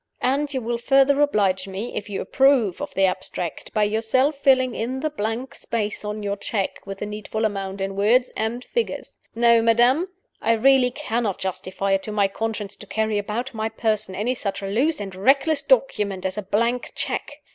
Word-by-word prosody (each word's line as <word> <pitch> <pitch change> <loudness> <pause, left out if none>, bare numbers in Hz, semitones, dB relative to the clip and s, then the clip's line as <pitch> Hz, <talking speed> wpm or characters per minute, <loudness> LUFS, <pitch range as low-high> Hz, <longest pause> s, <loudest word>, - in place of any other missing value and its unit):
And 280 +3 +1
you 260 -2 -2
will 235 +1 -2
further 275 +3 +4
oblige 195 -9 +2
me, 195 +5 -5
if 205 0 -4
you 200 - -3
approve 265 -9 +3
of - - -4
the 195 - +4
abstract, 180 -2 -3
by 215 - +2
yourself 225 +7 +1
filling 260 -3 +3
in 255 +4 -3
the 310 - -1
blank 230 0 -3
space 215 -3 -3
on 210 0 -4
your 200 0 -2
check 200 -1 -3
with 195 0 -5
the 210 - -4
needful 215 +1 -3
amount 195 -2 -3
in 195 0 -2
words 235 +6 +3
and 230 +3 -2
figures. 470 - -3 0.2
No, 235 0 +5
madam! 240 +9 +4 0.3
I 230 - +3
really 260 +2 +4
cannot 235 -7 -2
justify 190 +1 -3
it 195 0 +3
to 215 - -6
my 205 -2 +2
conscience 210 0 -4
to 205 - -12
carry 220 0 0
about 220 +6 -4
my 220 0 -2
person 215 -3 -1
any 220 +6 0
such 200 -5 -4
loose 245 +11 +1
and 195 -2 -6
reckless 275 +9 +3
document 220 -9 +1
as 190 0 -1
a 210 - -2
blank 235 +5 -1
check. - - -3
220 Hz, 190 wpm, -23 LUFS, 200-255 Hz, 0.3 s, No